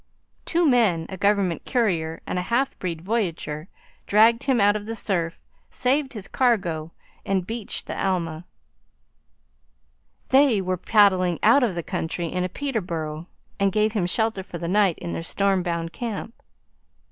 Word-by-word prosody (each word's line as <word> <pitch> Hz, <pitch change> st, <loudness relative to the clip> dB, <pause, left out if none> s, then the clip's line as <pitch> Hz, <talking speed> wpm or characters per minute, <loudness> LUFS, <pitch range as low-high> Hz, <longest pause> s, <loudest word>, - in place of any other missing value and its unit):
Two 340 Hz, -1 st, +2 dB
men, 215 Hz, -, +3 dB
a 190 Hz, -, -5 dB
government 200 Hz, -3 st, +1 dB
courier 170 Hz, -10 st, 0 dB
and 180 Hz, -, -2 dB
a -, -, 0 dB
half 240 Hz, +8 st, 0 dB
breed 170 Hz, -3 st, -4 dB
voyageur, 175 Hz, -7 st, -2 dB, 0.4 s
dragged 225 Hz, +4 st, +4 dB
him 265 Hz, -3 st, +2 dB
out 205 Hz, 0 st, +4 dB
of 210 Hz, 0 st, -5 dB
the 225 Hz, -, -4 dB
surf, 170 Hz, -6 st, -1 dB, 0.3 s
saved 270 Hz, +2 st, 0 dB
his 210 Hz, -4 st, -7 dB
cargo, 180 Hz, -11 st, 0 dB, 0.3 s
and 190 Hz, -2 st, 0 dB
beached 225 Hz, 0 st, -5 dB
the -, -, -4 dB
Alma. 170 Hz, -3 st, -1 dB, 1.8 s
They 265 Hz, -5 st, +5 dB
were 185 Hz, -1 st, -1 dB
paddling 185 Hz, -3 st, +3 dB
out 235 Hz, +6 st, +6 dB
of 225 Hz, -8 st, +1 dB
the 170 Hz, -, -3 dB
country 165 Hz, +2 st, -3 dB
in 180 Hz, +2 st, -2 dB
a 180 Hz, -, -2 dB
Peterborough, 170 Hz, -, -4 dB, 0.3 s
and 200 Hz, 0 st, +3 dB
gave 215 Hz, +2 st, +2 dB
him 200 Hz, -5 st, 0 dB
shelter 220 Hz, +1 st, 0 dB
for 180 Hz, -2 st, -8 dB
the 170 Hz, -, -4 dB
night 195 Hz, -2 st, +3 dB
in 85 Hz, -, -5 dB
their 85 Hz, -, -3 dB
storm 195 Hz, -, +1 dB
bound 170 Hz, -1 st, -3 dB
camp. 230 Hz, -1 st, -5 dB
195 Hz, 160 wpm, -24 LUFS, 170-225 Hz, 1.8 s, out